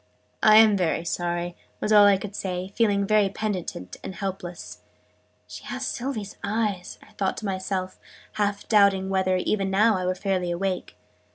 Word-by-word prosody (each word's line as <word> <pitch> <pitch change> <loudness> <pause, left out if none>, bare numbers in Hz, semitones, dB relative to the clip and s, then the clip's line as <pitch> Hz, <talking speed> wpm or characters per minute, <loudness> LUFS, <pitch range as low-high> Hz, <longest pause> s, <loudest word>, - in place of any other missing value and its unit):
"I'm 215 -1 +7
very 170 -3 0
sorry," 175 0 -2 0.2
was 215 - 0
all 205 -1 +8
I 200 -1 +5
could 200 +1 -7
say, 185 -1 -4
feeling 205 -3 +2
very 210 -1 +3
penitent 185 - -4
and 190 - -6
helpless. 185 -3 -6 0.7
"She - - -10
has - - -4
Sylvie's 240 -6 -4
eyes!" 205 -3 -2
I - - -20
thought 195 -1 -2
to 220 - -6
myself, 185 -1 -3 0.3
half 205 -1 -2
doubting 200 -3 +4
whether, 185 -1 +1
even 195 +1 0
now, 210 +3 +4
I 185 -1 -2
were 185 - 0
fairly 185 -2 -1
awake. 180 - -3
195 Hz, 160 wpm, -25 LUFS, 185-210 Hz, 0.7 s, all